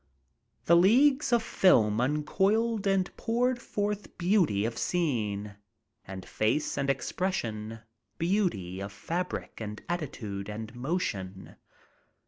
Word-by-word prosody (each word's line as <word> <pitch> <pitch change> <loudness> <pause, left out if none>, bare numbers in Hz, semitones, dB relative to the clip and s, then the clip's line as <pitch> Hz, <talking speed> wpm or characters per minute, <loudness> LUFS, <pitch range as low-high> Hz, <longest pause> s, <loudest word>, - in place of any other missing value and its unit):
The 170 - +6
leagues 265 - +5
of 235 -1 +3
film 110 - +4
uncoiled 195 - +1
and 195 -2 +1
poured 240 +2 0
forth 205 -1 -3
beauty 175 - +2
of 115 0 -2
scene, 105 - -1 0.5
and 95 -1 -8
face 115 +8 0
and 140 0 -1
express 180 +6 -1
ion, 110 0 -6 0.4
beauty 165 - 0
of 100 +1 -5
fabric 170 - -4
and 105 -1 -5
attitude 110 - -4
and 110 +2 -6
motion. 115 - -3
150 Hz, 110 wpm, -29 LUFS, -, 0.5 s, The